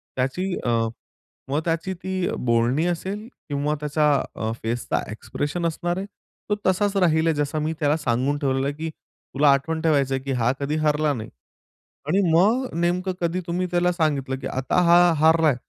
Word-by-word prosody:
त्याची 130 +8 -1 0.2
अ, - - +1 0.8
मग 145 +2 +1
त्याची 165 +3 -1
ती 185 0 -3
अ, - - -2
बोलणी 120 +6 +2
असेल 190 +5 -3 0.2
किंवा 145 +1 0
त्याच्या 150 +1 +1 0.3
अ, 110 0 -2
फेसचा 115 +2 -1
एक्सप्रेशन 145 +9 -3
असणार 175 +2 -1
आहे. 190 - -3 0.4
तो 210 - +2
तसाच 200 +2 +1
राहील 165 -3 +3
आहे 165 - +3
जसा 145 +1 -1
मी 155 +1 -1
त्याला 150 0 +2
सांगून 135 0 0
ठेवलेलं 135 -2 0
आहे 145 - -2
की 160 +2 -4
तुला 145 -2 -1
आठवण 160 +4 -1
ठेवायचं 140 -5 +2
आहे, 130 - -4
की 140 - -3
हा 125 -2 +2
कधी 145 +2 -1
हरला 150 0 +2
नाही. 110 -4 -6 0.8
आणि 180 +6 +2
मग 215 +11 +3
नेमकं 180 +2 0
कधी 170 +1 0
तुम्ही 180 +2 -1
त्याला 175 0 +2
सांगितलं 145 -6 0
की 135 - -4
आता 130 +6 0
हा 170 +1 +7 0.2
हारलाय 160 -2 +4
155 Hz, 175 wpm, -23 LUFS, 140-175 Hz, 0.8 s, हा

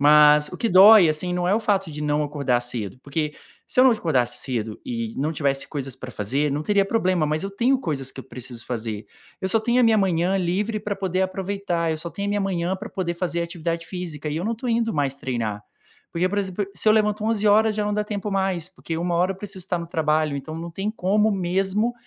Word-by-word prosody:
Mas 150 0 +6
o 180 - -8
que 230 - 0
dói, 195 0 +8
assim, 155 +4 -1
não 180 0 -1
é - - +3
o - - +3
fato 195 -5 0
de 150 0 -7
não 150 0 +1
acordar 140 -4 0
cedo, 120 -5 -3
porque 150 +1 -3 0.3
se - - +2
eu - - +7
não 260 - +7
acordasse 155 - 0
cedo 115 -5 -4
e 115 -2 -3
não 150 +4 -1
tivesse 140 -3 -1
coisas 135 -4 -5
para 130 -1 -8
fazer, 135 +9 -1
não 145 +2 -2
teria 200 +3 +2
problema, 185 -6 +1
mas 155 +1 -1
eu 195 - -3
tenho 240 +7 +2
coisas 135 - -3
que - - -8
eu - - -13
preciso 125 -2 -6
fazer, 110 -3 -4 0.3
eu 190 - -1
só 225 - +4
tenho 235 +3 +2
a - - +4
minha 225 -2 +5
manhã 185 -1 +1
livre 195 +4 -1
para 210 0 -3
poder 190 -1 -1
aproveitar, 185 -3 -2
eu 160 - -1
só 165 +2 -2
tenho 200 +3 -4
a - - 0
minha 205 0 0
manhã 185 -1 -1
para 210 +4 -8
poder 180 -5 -3
fazer 170 -1 -2
atividade 170 -1 -4
física 165 -5 -5
e 150 - -3
eu 170 - -2
não 230 +2 0
tô 245 +3 -5
indo 230 -2 +1
mais 140 -2 0
treinar, 115 -6 -3 0.5
porque, 175 +2 +1
por 205 +2 -1
exemplo, 195 0 -2
se 195 +3 0
eu - - +7
levanto 210 -1 +1
11h 215 0 +3
já 210 0 -1
não 210 - -1
dá 210 0 0
tempo 210 -1 -4
mais, 190 -3 -1
porque 170 -3 -6
13h 175 +2 +1
eu - - -13
preciso 195 -1 -7
estar 180 -2 -1
no 170 - -6
trabalho, 155 -2 +1
então 140 +3 -6
não 170 +1 -6
tem 195 +5 -3
como 210 +1 +2
mesmo 195 +4 0
175 Hz, 240 wpm, -23 LUFS, 150-200 Hz, 0.5 s, dói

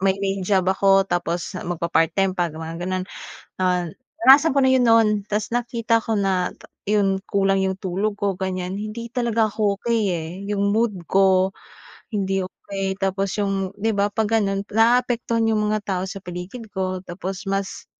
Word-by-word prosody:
may 190 0 +2
main 195 0 -2
job 190 0 +2
ako, 195 0 +4
tapos 175 -2 -2
magpa-part-time 170 +2 +1
pa, 175 -1 +1
mga 160 +1 -7
gano'n. 185 +1 -2 0.5
Ah, 180 -2 +1 0.3
naranasan 280 +1 +7
ko 275 - +3
na 260 - +4
‘yon 260 -1 +4
noon. 225 -1 +6 0.2
Tas 210 0 -1
nakita 235 -1 +1
ko 225 - -1
na 190 -2 +1 0.4
‘yon, 200 -2 +2
kulang 195 -1 +2
‘yong 190 0 0
tulog 195 +2 -2
ko, 200 -1 0
ganyan, 185 -1 -3
hindi 215 +3 -6
talaga 235 -2 +1
ako 200 -1 0
okey, 230 -2 +1
eh. 160 -1 -4 0.2
‘Yong 200 0 +1
mood 225 -1 +1 0.2
ko 190 -1 +4 0.6
hindi 195 -2 0
okey, 195 0 -4
tapos 195 0 -1
'yong, 195 -2 -1
‘di 220 +2 0
ba, 200 0 +2
'pag 220 -1 0
gano’n, 195 -1 -1
naaapektuhan 230 0 +2
‘yong 210 -1 +1
mga 215 - +1
tao 185 -2 -1
sa 195 - -7
paligid 180 +6 -7
ko. 185 -1 -2
Tapos 185 +2 -6
mas 195 0 -3
195 Hz, 165 wpm, -22 LUFS, 185-220 Hz, 0.6 s, naranasan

